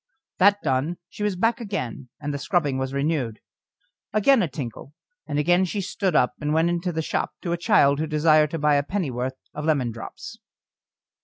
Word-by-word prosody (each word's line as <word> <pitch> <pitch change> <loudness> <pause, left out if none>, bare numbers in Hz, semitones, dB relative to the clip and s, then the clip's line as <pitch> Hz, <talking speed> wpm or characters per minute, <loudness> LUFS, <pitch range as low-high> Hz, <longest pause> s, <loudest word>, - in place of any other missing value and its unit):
That 200 +2 +5
done, 145 +4 0
she - - -11
was 205 -2 0
back 225 +6 +1
again, 145 - -4
and 145 -1 -4
the 140 - -3
scrubbing 145 -3 0
was 130 0 -2
renewed. 140 -5 -1 0.7
Again 225 +4 +4
a 175 - +1
tinkle, 135 0 -7 0.3
and 145 - -2
again 175 +5 +3
she 190 +3 -2
stood 190 -2 -1
up 125 - +3
and 150 +1 0
went 165 +1 +3
into 175 +1 -1
the 160 -1 -2
shop - - -2
to 170 - -2
a - - +2
child 140 -4 +4
who 160 - -1
desired 155 0 +4
to 165 - -3
buy 150 -1 +3
a 140 - +1
pennyworth 130 -8 -3 0.2
of 150 - -5
lemon 140 -7 +1
drops. 115 0 -9
155 Hz, 190 wpm, -24 LUFS, 140-175 Hz, 0.7 s, That